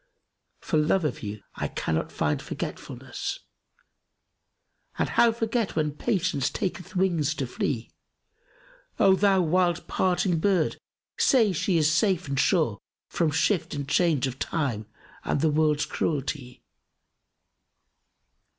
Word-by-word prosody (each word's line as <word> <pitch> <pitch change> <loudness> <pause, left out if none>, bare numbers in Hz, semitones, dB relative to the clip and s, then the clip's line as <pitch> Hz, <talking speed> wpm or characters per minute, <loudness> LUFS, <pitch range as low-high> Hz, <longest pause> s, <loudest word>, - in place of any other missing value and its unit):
For - - 0
love 155 +3 +2
of 150 - -2
you 105 -1 -6
I - - -3
cannot 80 0 -2
find - - -1
forgetfulness; - - -5 0.7
* - - -39
And - - 0
how 235 - +4
forget 225 -1 -1
when 155 -2 +1
Patience 160 - 0
taketh 185 -1 -4
wings 175 -6 +1
to 135 - -2
flee? 120 -1 -3 1.1
O 190 - +5
thou 195 -1 +3
wild 175 +1 +1
parting 180 -2 +1
bird[FN#276] 185 -5 +2 0.4
say 235 -6 +5
is - - -4
she 170 +1 +1
safe 170 +3 +2
and 135 -1 -1
sure 150 - +2 0.2
* - - -67
From 165 -2 +1
shift 160 +2 0
and 140 -1 -4
change 150 -1 +2
of 130 0 -5
time 120 -10 -2 0.4
and - - 0
the 155 +1 +2
world's 150 -1 +2
cruelty?" 140 -4 -3
160 Hz, 130 wpm, -26 LUFS, 140-185 Hz, 1.1 s, O